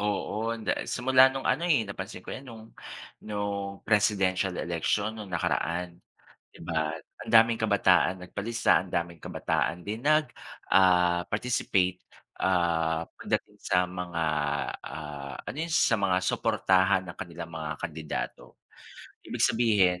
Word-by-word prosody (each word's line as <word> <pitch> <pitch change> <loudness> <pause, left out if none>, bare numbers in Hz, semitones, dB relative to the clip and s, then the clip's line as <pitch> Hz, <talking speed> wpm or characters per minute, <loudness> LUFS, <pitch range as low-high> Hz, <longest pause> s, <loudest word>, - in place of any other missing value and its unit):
Oo, 105 +2 -1
anda 110 -1 -1 0.2
simula 130 +2 +5
nung 135 0 -5
ano 155 +7 +1
eh, 140 -9 +3
napansin 95 -2 -7
ko - - -7
yan 130 0 -8
nung 110 -1 -10 0.6
nung 100 -2 -4
presidential 100 -3 +2
election 95 +5 -1
nung 105 -3 -8
nakaraan, 85 0 -2 0.5
di - - -16
ba 80 -2 -1 0.3
ang - - -7
daming 115 0 +6
kabataan 95 -3 +3
nagpalista, 110 +5 +1
ang 90 - -14
daming 85 0 -2
kabataan 85 +4 -1
din 110 +5 -5
nag 155 0 +4 0.4
ah, 90 -2 +4
participate, 100 -5 0 0.3
ah, 85 -3 +1
pagdating - - -3
sa 90 0 +2
mga, 90 -2 -4 0.6
ah, 70 -3 -7
ano - - -5
yun 165 +1 -3
sa 115 - +4
mga 95 -2 +1
suportahan 95 0 +2
ng 85 - -8
kanilang 85 -1 -7
mga 80 -1 -4
kandidato. 80 -2 -5 0.6
Ibig - - -4
sabihin, 105 -6 +3
95 Hz, 130 wpm, -28 LUFS, 85-110 Hz, 0.6 s, daming